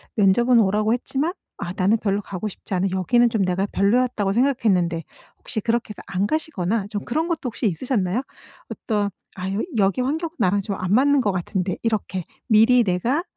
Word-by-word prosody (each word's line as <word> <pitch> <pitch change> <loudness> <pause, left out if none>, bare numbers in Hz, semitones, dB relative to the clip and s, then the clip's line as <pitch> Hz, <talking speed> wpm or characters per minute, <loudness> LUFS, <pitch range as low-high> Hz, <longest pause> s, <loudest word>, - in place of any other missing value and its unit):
면접은 235 +4 +4
오라고 210 +1 +2
했지만 275 +6 -1 0.3
'아 175 - -4
나는 200 +4 +3
별로 200 -1 0
가고 200 +1 -5
싶지 195 - -9
않은 190 +2 +1
여기는 240 +6 +3
좀 220 -4 0
내가 185 +2 0
별로였다.'고 205 -1 +1
생각했는데 200 -10 +1 0.4
혹시 220 - -4
그렇게 235 0 -1
해서 210 - -9
안 190 +1 0
가시거나 220 - -1
좀 205 -2 -4
그런 315 +7 -1
것도 335 -3 -1
혹시 230 -1 -1
있으셨나요? 210 - -1 0.5
어떤 205 -3 -2 0.2
'아 190 0 -4
여 205 - -1 0.2
여기 200 +3 +2
환경은 320 +6 -2
나랑 200 +2 +2
좀 200 0 -4
안 185 0 -3
맞는 280 +3 +4
것 205 -5 +1
같은데.' 185 0 -2
이렇게 205 -5 -1 0.2
미리 225 +3 +6
내가 230 - 0
210 Hz, 385 characters per minute, -22 LUFS, 190-245 Hz, 0.5 s, 미리